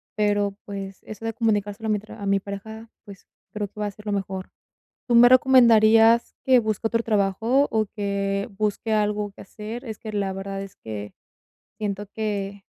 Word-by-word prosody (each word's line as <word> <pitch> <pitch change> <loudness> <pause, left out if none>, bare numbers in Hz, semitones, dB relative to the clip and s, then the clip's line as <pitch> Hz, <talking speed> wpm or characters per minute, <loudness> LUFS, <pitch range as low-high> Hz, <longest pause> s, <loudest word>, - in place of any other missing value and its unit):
Pero, 205 -2 +1
pues, 195 -1 -7
eso 215 +1 -9
de 225 - -2
comunicárselo 215 -1 -1
a - - -1
mi 210 - +2
tra 215 0 -12
a - - -4
mi 200 0 +3
pareja, 220 +3 -8 0.2
pues, 200 -2 -13 0.3
creo 210 -1 -3
que 210 - -14
va 210 - -1
a - - -4
ser 210 +2 -16
lo 210 - -2
mejor. 190 -1 -4 0.6
¿Tú 240 - +2
me 240 +1 +8
recomendarías 230 -3 +6
que 255 -2 +5
busque 220 0 -1
otro 230 +1 0
trabajo, 225 +6 +2
o 220 -1 +2
que 200 +1 -1
busque 215 +1 -1
algo 210 -1 0
que - - -14
hacer? 220 +5 -8
Es 220 -2 -7
que 215 - -7
la 200 -2 -1
verdad 195 0 -5
es 195 -1 -9
que 105 -2 -7 0.7
siento 205 -1 -3
que 200 -2 -4
210 Hz, 190 wpm, -24 LUFS, 200-225 Hz, 0.7 s, me